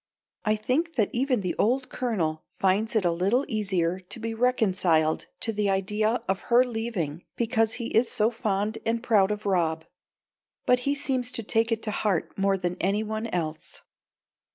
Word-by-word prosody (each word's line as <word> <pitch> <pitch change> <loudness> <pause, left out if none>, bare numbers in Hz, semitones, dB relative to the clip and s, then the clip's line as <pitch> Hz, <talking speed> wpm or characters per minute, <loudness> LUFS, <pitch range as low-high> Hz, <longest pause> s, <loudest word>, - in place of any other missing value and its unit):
I 215 -1 +2
think 285 +10 -1
that 215 -6 +1
even 255 -2 +1
the 180 -2 -1
old 255 +4 +1
Colonel 165 -11 -2 0.2
finds 200 +4 +1
it 210 -4 +2
a 175 - +3
little 200 +11 +1
easier 190 - 0
to 185 +5 -7
be 225 0 -3
reconciled 185 -10 +2
to 225 - 0
the 205 -1 0
idea 210 +4 0
of 190 0 0
her 245 +1 +6
leaving 225 - -3
because 225 -1 +1
he 235 -1 -4
is 230 +2 +4
so 220 +2 +2
fond 215 -2 -1
and 230 +1 -1
proud 205 -5 +4
of 210 0 -3
Rob. 165 -4 +1 0.8
But 250 - +4
he 285 - +2
seems 260 -3 0
to 230 - -1
take 225 +2 +1
it 225 0 -1
to 215 - -2
heart 205 -5 -1
more 195 0 +2
than 180 -1 -3
any 200 +4 +1
one 220 +1 -3
else. 160 -6 -4
215 Hz, 175 wpm, -26 LUFS, 190-235 Hz, 0.8 s, her